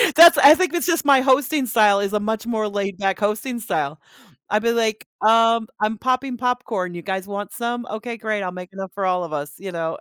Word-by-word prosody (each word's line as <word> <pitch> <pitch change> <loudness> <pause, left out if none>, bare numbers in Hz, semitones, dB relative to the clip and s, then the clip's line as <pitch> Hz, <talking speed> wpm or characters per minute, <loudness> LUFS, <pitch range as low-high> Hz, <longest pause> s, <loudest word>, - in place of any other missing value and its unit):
That's 335 -1 +9
I 295 +3 +8
think 370 -1 -1
it's 345 - -1
just 330 -3 0
my 275 -2 +5
hosting 270 +1 +2
style 210 -4 +3
is 200 +1 -2
a 210 - +1
much 220 +2 -3
more 220 -2 -2
laid 200 -2 -4
back 195 0 -1
hosting 215 +4 -2
style. 155 -9 -3 0.5
I'd 210 +1 +1
be, 230 - +2
like, 225 -2 -1
"Um, 230 +1 +3
I'm 215 +1 -1
popping 255 +1 -1
popcorn, 235 -7 -2
you 175 - -7
guys 190 +1 -4
want 205 0 -6
some? 240 -1 -4
Okay, 230 +2 -6
great, 215 -2 -3
I'll 180 - -4
make 180 +1 -10
enough 195 -1 -7
for 195 -1 -3
all 180 -1 0
of 165 - -7
us," 145 0 -5
you 190 0 -8
know. 165 -1 -4
215 Hz, 230 wpm, -21 LUFS, 195-245 Hz, 0.5 s, That's